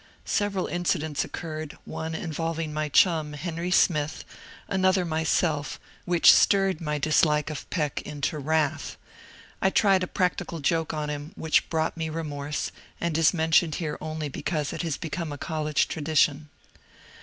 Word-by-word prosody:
Several 205 -3 0
incidents 160 -4 -1
occurred, 155 -2 -6
one 160 0 -5
involving 165 -1 -3
my 155 0 -2
chum, 155 -1 +3
Henry 165 +3 -4
Smith, 155 -4 +2 0.4
another 185 -1 +2
myself, 160 -2 0 0.3
which 175 -2 +7
stirred 195 -4 +3
my 150 -2 -1
dis 155 +1 +3
like 150 -1 +2
of 150 - -7
Peck 150 -5 -1
into 150 +1 -3
wrath; 155 0 0 0.6
and - - +4
I - - +5
tried 195 -1 +4
a 185 - -1
practical 180 -2 -1
joke 165 +2 0
on 150 -1 -3
him, 145 +3 -6
which 160 -1 +1
brought 160 0 -1
me 160 -1 -2
remorse, 150 -2 -3 0.3
and 170 -2 -1
is 160 -1 +5
mentioned 160 -1 +2
here 155 -3 -3
only 155 -1 -4
be 140 - -7
cause 150 -4 -2
it - - -3
has 165 -5 -2
become 165 -1 -4
a 145 - -5
college 155 0 0
tradition. 150 -1 +1
160 Hz, 155 wpm, -26 LUFS, 150-170 Hz, 0.6 s, which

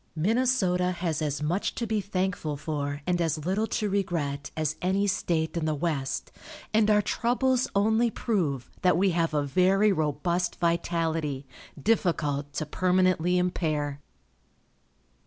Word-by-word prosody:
Minnesota 190 -1 +2
has 170 -3 -2
as 150 -1 -2
much 175 +7 -1
to 235 - -2
be 215 -1 0
thankful 185 -6 -2
for 145 -1 -3
and 175 -1 +1
as 155 -2 -1
little 200 +5 0
to 215 - -1
regret 165 -8 -2
as 155 -1 0
any 190 +2 +1
state 170 -5 0
in 165 -2 -1
the 155 -1 0
West, 145 -3 -2 0.4
and 215 0 +4
our 210 -1 +4
troubles 250 +3 +1
only 220 +4 +3
prove 165 - -1
that 180 -3 +4
we 190 +1 +3
have 165 -2 0
a 145 - +2
very 185 +8 +3
robust 170 +2 0
vitality, 165 -4 -1 0.3
difficult 150 -7 0
to 155 +2 -3
permanently 180 +1 +2
impair. 155 -5 -1
175 Hz, 140 wpm, -27 LUFS, 150-195 Hz, 0.4 s, and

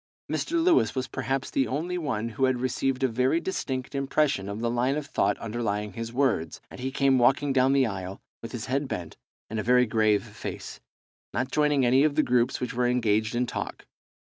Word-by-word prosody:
Mr. - - -2
Lewis 340 - +3
was 130 -1 -1
perhaps 135 0 -3
the 135 - +1
only 165 +7 -2
one 125 -10 -2
who 125 +4 0
had 130 -1 +1
received 130 +1 -1
a - - +5
very 130 +6 +1
distinct 130 -9 -3
impression 135 -7 0
of 100 +1 -5
the 120 - -1
line 125 +3 +1
of 150 - -3
thought - - 0
underlying 105 -3 -3
his 115 +1 -5
words, 120 - 0
and - - -10
he 130 +1 -2
came 135 -1 +3
walking 135 +3 +3
down 130 0 +4
the 135 -1 +4
aisle 95 -3 -5 0.2
with 115 - -7
his 120 -2 -5
head 135 +2 -1
bent 85 -9 -5 0.3
and 110 - -4
a - - -2
very 125 +1 +4
grave 110 -2 +2
face, - - -7 0.6
not 130 +1 -1
joining 150 -3 +2
any 130 +3 +5
of 150 -2 +2
the 155 - +3
groups 120 0 +1
which 125 - -3
were 125 0 +1
engaged 110 -2 +1
in 125 +1 +1
talk. - - -5
125 Hz, 205 wpm, -27 LUFS, 115-135 Hz, 0.6 s, a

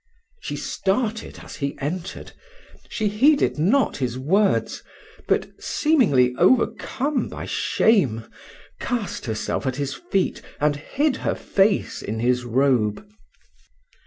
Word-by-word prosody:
She - - -4
started 215 +2 -2
as - - -10
he 140 -1 -3
entered 170 +6 -5 0.6
she 215 - -1
heeded 260 - +3
not 230 - +2
his 125 -2 -2
words; 190 +10 +1 0.5
but, - - +1
seemingly 170 - +3
overcome 260 +6 +1
by - - -7
shame, 135 - +2 0.5
cast 230 - -3
herself 110 +4 -2
at 130 - -1
his 140 0 -3
feet, 195 - -1 0.2
and 150 0 +2
hid 270 - -1
her - - -1
face 200 +1 +1
in 110 - -4
his 125 +2 +1
robe. 125 - +1
180 Hz, 115 wpm, -23 LUFS, -, 0.6 s, heeded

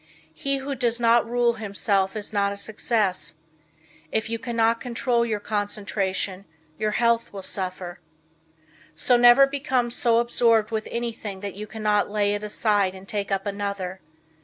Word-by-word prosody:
He 275 -2 -1
who 275 +1 -4
does 240 -2 0
not 230 0 +4
rule 240 0 +2
himself 200 -1 0
is 215 0 -5
not 200 -1 +2
a 200 - -6
success. 200 -6 -1 0.8
If 220 0 -1
you 230 - -2
cannot 230 -1 +1
control 240 -1 0
your 220 -3 -1
concentration, 200 -2 -2 0.3
your 215 -1 +1
health 235 +1 +1
will 195 -1 -7
suffer. 185 -2 -5 1.0
So 250 - +3
never 240 +3 +8
become 265 -3 -1
so 235 -1 +2
absorbed 230 -2 +3
with 220 -1 -2
anything 225 -5 -4
that 200 -2 -5
you 210 +2 -7
cannot 210 -1 0
lay 205 -1 +1
it 205 0 -3
aside 205 -2 +1
and 190 +1 -12
take 205 -1 -3
up 195 +1 0
another. 200 -2 -4
215 Hz, 155 wpm, -24 LUFS, 200-235 Hz, 1.0 s, never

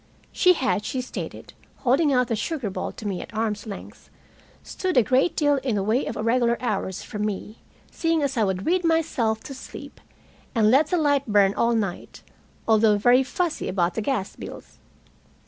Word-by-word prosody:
She 365 -1 +5
had, 255 - 0
she 255 +4 -3
stated, 250 - -7 0.3
holding 280 +4 +3
out 250 -2 +2
the 230 - 0
sugar 235 -1 -3
bowl - - -4
to 215 - -7
me 190 -3 -3
at - - -10
arm's 215 -1 -2
length, 200 -2 -9 0.5
stood 370 -4 -2
a 245 - +7
great 260 - +2
deal 290 -2 +3
in 260 -4 -1
the 200 - 0
way 220 +6 +1
of - - -4
irregular 235 +1 +2
hours 200 -6 -2
from 210 0 -5
me, 210 +1 -4 0.3
seeing 330 -2 0
as 275 -1 -1
I 225 - +2
would 190 -1 -1
read 360 +2 +2
myself 300 -10 +1
to 275 - -8
sleep, 265 - -10 0.5
and 215 -1 +4
let 285 +4 +5
the 355 - 0
light 285 -4 +2
burn 200 -2 +4
all 235 +2 +1
night, 200 -5 -4 0.4
although 220 -1 +4
very 245 +5 +5
fussy 315 +6 -2
about 180 -2 0
the 220 - -2
gas 215 -4 -2
bills. - - -10
235 Hz, 185 wpm, -24 LUFS, 210-280 Hz, 0.5 s, a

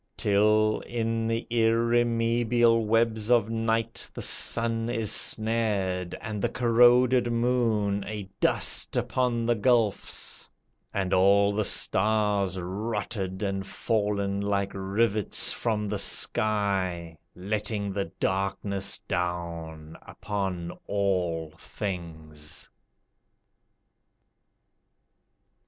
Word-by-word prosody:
Till, 105 +1 +3
in 115 -1 -1
the 115 0 -1
irremeable 115 0 +2
webs 115 -1 +1
of 115 -3 +3
night 115 0 -1
The - - -5
sun 115 0 0
is 110 -3 -1
snared, 105 -7 +1
and 105 -2 -5
the - - +1
corroded 120 +1 +4
moon 115 -4 +1
A 105 0 -5 0.2
dust - - +1
upon 120 -2 0
the 120 - +3
gulfs, 115 -2 0 0.4
and 95 -1 -1
all 100 +2 +4
the 105 +1 0
stars 100 -2 +1
Rotted 100 0 -4
and 95 -1 -2
fall'n 100 -1 -1
like 100 -1 -1
rivets 100 +2 +1
from 105 -2 -1
the - - -2
sky, 95 -6 0 0.2
Letting 100 +1 -2
the 100 0 -1
darkness 95 +2 -2
down 85 -3 -4
upon 95 -4 -4 0.2
all 90 -6 -1
things. 80 -6 -6
105 Hz, 90 wpm, -27 LUFS, 95-115 Hz, 0.4 s, corroded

